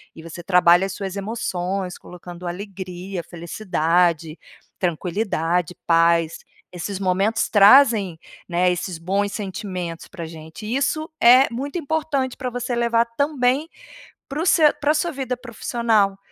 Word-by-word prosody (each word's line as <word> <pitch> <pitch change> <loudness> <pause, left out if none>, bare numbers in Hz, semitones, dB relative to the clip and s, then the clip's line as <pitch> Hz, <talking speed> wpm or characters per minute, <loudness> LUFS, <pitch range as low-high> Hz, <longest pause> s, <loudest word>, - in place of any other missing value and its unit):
e 160 - -11
você 165 +1 -8
trabalha 180 0 +5
as 195 - -5
suas 195 -2 -5
emoções 190 -3 -3
colocando 175 0 -11
alegria, 185 -1 -6
felicidade, 170 -2 0 0.4
tranquilidade, 180 -1 -1
paz. 165 -1 +3 0.3
Esses 190 +3 -5
momentos 195 +4 +1
trazem, 205 - +5 0.3
né, 180 +1 +2
esses 180 -1 -4
bons 200 +4 -1
sentimentos 185 -4 -5
pra 170 -4 -7
gente 160 +5 -10
e 225 +4 -2
isso 310 +3 -1
é 255 +3 +7
muito 280 +8 -4
importante 285 -4 -2
pra 255 - -3
você 245 0 -3
levar 235 0 +2
também 285 +1 +1 0.6
para 290 +3 -3
o 340 - -1
seu 310 -4 +5
pra 295 +1 +3
sua 335 +2 0
vida 260 -3 -3
profissional. 225 -4 0
195 Hz, 130 wpm, -22 LUFS, 175-245 Hz, 0.6 s, é